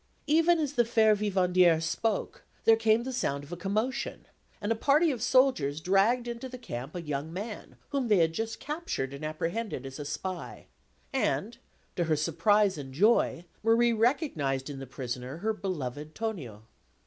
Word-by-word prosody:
Even 330 Hz, +3 st, +4 dB
as 295 Hz, -3 st, -1 dB
the 240 Hz, -, +4 dB
fair 220 Hz, -2 st, +4 dB
vivandière 185 Hz, -4 st, +3 dB
spoke, 195 Hz, +6 st, -2 dB, 0.2 s
there 225 Hz, -, +7 dB
came 225 Hz, +1 st, +3 dB
the 260 Hz, +1 st, -4 dB
sound 140 Hz, -, -1 dB
of 145 Hz, -, -13 dB
a -, -, -3 dB
commotion, 215 Hz, +9 st, -2 dB, 0.3 s
and 205 Hz, +2 st, -2 dB
a -, -, +3 dB
party 295 Hz, +7 st, +3 dB
of 245 Hz, -5 st, -4 dB
soldiers 245 Hz, -, +3 dB
dragged 200 Hz, +8 st, +2 dB
into 240 Hz, +2 st, -5 dB
the 255 Hz, -, -8 dB
camp 135 Hz, -, -7 dB
a 175 Hz, -, -3 dB
young 150 Hz, 0 st, -3 dB
man, 205 Hz, +5 st, -7 dB
whom 275 Hz, -3 st, -1 dB
they 210 Hz, -3 st, +4 dB
had 165 Hz, -2 st, +3 dB
just 225 Hz, +5 st, -3 dB
captured 295 Hz, -, -3 dB
and 140 Hz, -, -8 dB
apprehended 165 Hz, -, -3 dB
as 135 Hz, +2 st, -8 dB
a -, -, -3 dB
spy; 180 Hz, +5 st, -5 dB, 0.5 s
and, 235 Hz, -4 st, -1 dB, 0.4 s
to 175 Hz, -, 0 dB
her 160 Hz, -1 st, +2 dB
surprise 190 Hz, +4 st, +2 dB
and 135 Hz, -2 st, -8 dB
joy, 195 Hz, -2 st, +3 dB, 0.2 s
Marie 230 Hz, +1 st, +4 dB
recognised 190 Hz, -, 0 dB
in 135 Hz, -, -7 dB
the 135 Hz, -, -7 dB
prisoner 125 Hz, +1 st, -5 dB
her 220 Hz, +5 st, -1 dB
beloved 150 Hz, -, -5 dB
Tonio. 150 Hz, -, -5 dB
200 Hz, 170 wpm, -29 LUFS, 155-235 Hz, 0.5 s, there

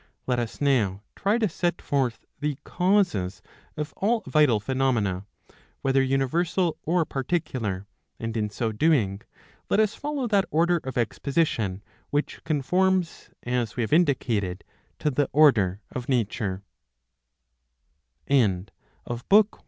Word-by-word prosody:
Let 125 Hz, -1 st, +1 dB
us 115 Hz, -2 st, -4 dB
now 110 Hz, -9 st, +1 dB
try 205 Hz, +3 st, +1 dB
to 225 Hz, -2 st, +2 dB
set 175 Hz, 0 st, -1 dB
forth 130 Hz, -5 st, -1 dB
the 150 Hz, -2 st, -2 dB
causes 180 Hz, -, +1 dB, 0.3 s
of 150 Hz, -1 st, -4 dB
all 220 Hz, +2 st, +1 dB
vital 150 Hz, -8 st, +4 dB
phenomena, 105 Hz, -6 st, 0 dB, 0.6 s
whether 135 Hz, 0 st, +3 dB
universal 160 Hz, +6 st, +1 dB
or 170 Hz, +1 st, +1 dB
particular, 130 Hz, -, -2 dB, 0.3 s
and 115 Hz, 0 st, -4 dB
in 105 Hz, -2 st, 0 dB
so 110 Hz, +2 st, -2 dB
doing 105 Hz, -6 st, +2 dB, 0.5 s
let 200 Hz, -, +3 dB
us 215 Hz, -1 st, +3 dB
follow 290 Hz, -1 st, -3 dB
that 200 Hz, -2 st, +3 dB
order 170 Hz, +2 st, +2 dB
of 130 Hz, -1 st, -5 dB
exposition, 115 Hz, -, 0 dB, 0.3 s
which 145 Hz, +1 st, -2 dB
conforms, 180 Hz, +4 st, +1 dB
as 120 Hz, -2 st, -1 dB
we 125 Hz, -, -1 dB
have 110 Hz, -, -2 dB
indicated, 115 Hz, -, +1 dB, 0.3 s
to 150 Hz, -, 0 dB
the 145 Hz, +2 st, +1 dB
order 110 Hz, -11 st, +4 dB
of 125 Hz, -1 st, -5 dB
135 Hz, 115 wpm, -26 LUFS, 115-170 Hz, 0.6 s, vital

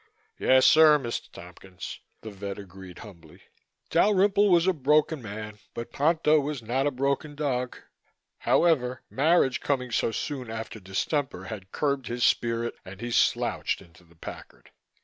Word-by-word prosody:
"Yes, 130 Hz, 0 st, +5 dB
sir, 155 Hz, -1 st, +7 dB
Mr. 120 Hz, -5 st, -5 dB
Tompkins," 90 Hz, +1 st, -10 dB, 0.2 s
the 110 Hz, -, -8 dB
vet 100 Hz, 0 st, -6 dB
agreed 95 Hz, -2 st, -11 dB
humbly. 85 Hz, -6 st, -15 dB, 0.5 s
Dalrymple 200 Hz, +2 st, +4 dB
was 170 Hz, -2 st, +4 dB
a 190 Hz, -, +3 dB
broken 150 Hz, 0 st, +2 dB
man 105 Hz, -1 st, -8 dB, 0.2 s
but 115 Hz, -, -6 dB
Ponto 155 Hz, +1 st, +3 dB
was 145 Hz, -3 st, -4 dB
not 130 Hz, +5 st, 0 dB
a -, -, +3 dB
broken 140 Hz, +2 st, -2 dB
dog. 125 Hz, -4 st, -2 dB, 0.6 s
However, 130 Hz, -7 st, +2 dB
marriage 145 Hz, -2 st, +3 dB
coming 125 Hz, -3 st, -1 dB
so 115 Hz, -, +1 dB
soon 130 Hz, 0 st, -4 dB
after 110 Hz, 0 st, -6 dB
distemper 100 Hz, -, -2 dB
had 95 Hz, -1 st, -8 dB
curbed 140 Hz, -4 st, -1 dB
his 120 Hz, +1 st, -2 dB
spirit 115 Hz, 0 st, +1 dB
and 95 Hz, +1 st, -11 dB
he 120 Hz, +2 st, -5 dB
slouched -, -, +1 dB
into 85 Hz, 0 st, -18 dB
the 85 Hz, 0 st, -23 dB
Packard. 80 Hz, -, -11 dB
125 Hz, 150 wpm, -27 LUFS, 105-150 Hz, 0.6 s, sir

